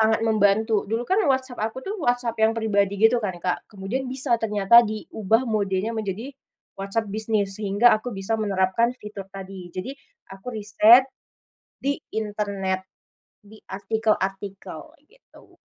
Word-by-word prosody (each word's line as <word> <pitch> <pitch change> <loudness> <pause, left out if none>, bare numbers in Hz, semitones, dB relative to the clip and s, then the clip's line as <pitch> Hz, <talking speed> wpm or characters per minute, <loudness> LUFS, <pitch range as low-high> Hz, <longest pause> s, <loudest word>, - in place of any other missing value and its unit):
sangat 220 0 +3
membantu. 215 0 +2
Dulu 230 +2 -1
kan 400 +3 +2
WhatsApp 260 -2 -1
aku 225 +4 -3
tuh 405 - -3
WhatsApp 245 -2 0
yang 220 - +5
pribadi 205 -3 0
gitu 225 +2 +4
kan, 185 -4 -3
Kak, 180 +4 -3
kemudian 225 +6 -4
bisa 260 -1 0
ternyata 210 +2 +5
diubah 220 +1 -1
modenya 210 0 -1
menjadi 220 +5 -5 0.5
WhatsApp 200 +1 -3
bisnis, 215 -2 0
sehingga 205 +4 +4
aku 215 +3 -1
bisa 220 +3 -2
menerapkan 205 +4 +1
fitur 210 -4 -9
tadi. 190 -2 -9
Jadi, 185 +9 -6 0.4
aku 195 +5 -10
riset 215 +4 +6 0.7
di 280 +1 -1 0.2
internet, 205 -3 -2 0.6
di 215 +1 -16
artikel-artikel, 195 -3 -2 0.2
gitu. 480 +10 -22
215 Hz, 135 wpm, -24 LUFS, 195-230 Hz, 0.7 s, riset